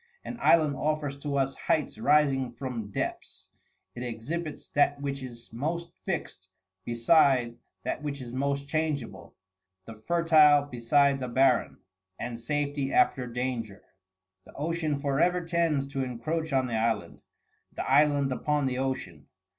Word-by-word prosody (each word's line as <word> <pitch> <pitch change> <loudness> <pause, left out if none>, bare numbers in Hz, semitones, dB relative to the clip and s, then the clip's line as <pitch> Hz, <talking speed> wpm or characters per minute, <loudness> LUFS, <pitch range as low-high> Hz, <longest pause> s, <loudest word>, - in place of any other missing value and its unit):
An 235 - -6
island 155 -4 +4
offers 150 -2 -1
to 140 0 -3
us 135 0 +1
heights 150 -8 -1
rising 135 -1 +3
from 120 -4 -5
depths; - - -5 0.4
it 120 - -8
exhibits 135 +7 -5
that 145 0 +2
which 140 -1 -3
is 120 -3 -10
most 160 +8 -3 0.2
fixed 95 - -4 0.3
beside 120 - +3 0.3
that - - -3
which 145 -1 -4
is 120 -2 -8
most 140 +1 -1
changeable, 140 - -3 0.5
the 115 - -8
fertile 155 +3 +4
beside 140 +2 +2
the 130 - -3
barren, 130 0 +2 0.4
and 120 -1 -5
safety 140 +2 -2
after 125 -3 +2
danger. 120 -4 -4 0.6
The - - -17
ocean 155 -1 -1
forever 145 +6 +1
tends 165 -5 +1
to 135 -1 -2
encroach 155 +7 -3
on 130 -1 +2
the 120 - -4
island, 115 +1 -1 0.5
the - - -5
island 145 -2 +3
upon 150 +2 0
the 130 -1 -1
ocean. 130 0 -4
140 Hz, 140 wpm, -28 LUFS, 125-150 Hz, 0.6 s, island